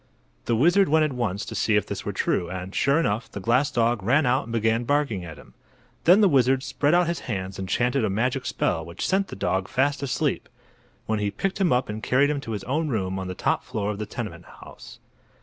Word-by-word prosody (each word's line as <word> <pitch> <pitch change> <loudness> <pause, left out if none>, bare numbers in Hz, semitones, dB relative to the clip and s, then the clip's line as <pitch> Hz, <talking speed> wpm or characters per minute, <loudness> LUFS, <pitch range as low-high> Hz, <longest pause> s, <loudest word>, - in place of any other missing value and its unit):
The 115 - +1
wizard 175 - +4
went 155 +1 +4
at 150 - -2
once 105 -6 -2
to - - -7
see 110 - +1
if 105 - +2
this - - -5
were - - -3
true, 85 - -1
and, 95 +1 -6
sure 140 +3 +2
enough, 110 -5 -1
the - - -7
glass 125 +8 +2
dog 120 -4 +1
ran 135 +10 +2
out 125 +3 +1
and 115 - -9
began 115 +1 +1
barking 140 -8 0
at 80 -3 -9
him. - - -16 0.5
Then 185 +5 +7
the 205 - +6
wizard 130 -4 +3
spread 145 +4 +1
out 175 0 +4
his 170 0 -2
hands 95 -3 -4
and 95 -1 -5
chanted 125 +4 +1
a 110 - +1
magic 125 +6 -1
spell 80 -2 -1
which 85 +2 -5
sent 195 +1 +1
the - - -8
dog 95 0 -1
fast 140 +2 0
asleep, 140 -2 -1 0.6
when 110 -1 -1
he 105 -1 0
picked 195 - -3
him 180 - +3
up 125 +1 +2
and 110 +1 -5
carried 140 +5 +2
him 145 -2 -2
to 115 -5 -5
his 105 - -4
own 155 +5 -1
room 95 -6 -2
on 95 - -5
the 90 - -5
top - - 0
floor 105 -1 -3
of 105 - -6
the 105 - -4
tenement - - -6
house. - - -13
120 Hz, 240 wpm, -25 LUFS, 100-145 Hz, 0.6 s, Then